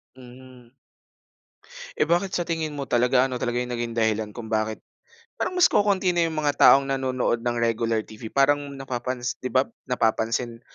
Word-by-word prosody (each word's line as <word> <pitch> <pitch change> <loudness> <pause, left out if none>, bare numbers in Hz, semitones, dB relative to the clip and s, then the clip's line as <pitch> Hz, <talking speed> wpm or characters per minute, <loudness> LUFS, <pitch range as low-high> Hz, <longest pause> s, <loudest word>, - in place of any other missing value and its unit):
Mhm. 125 -1 -15 1.3
Eh - - +3
bakit 175 +4 0
sa 175 - -1
tingin 160 -3 -3
mo 140 - -3
talaga, 125 +1 +3
ano 130 -2 -3
talaga 120 0 -2
yung 125 0 -6
naging 120 -1 -4
dahilan 110 -1 0
kung 115 -2 -8
bakit 110 0 -1 0.6
parang - - -2
mas 360 -1 +5
kokonti 200 -3 +2
na 170 -1 +2
yung 160 - -4
mga 145 -2 0
taong 140 0 +7
nanonood 130 -3 0
ng 120 0 -2
regular 115 -1 0
TV? 110 +1 -10
Parang 140 +2 +1
napapansi 125 -2 -4
'di 130 - -3
ba, 130 +1 +4 0.2
napapansin 115 0 -1
125 Hz, 170 wpm, -24 LUFS, 115-140 Hz, 1.3 s, taong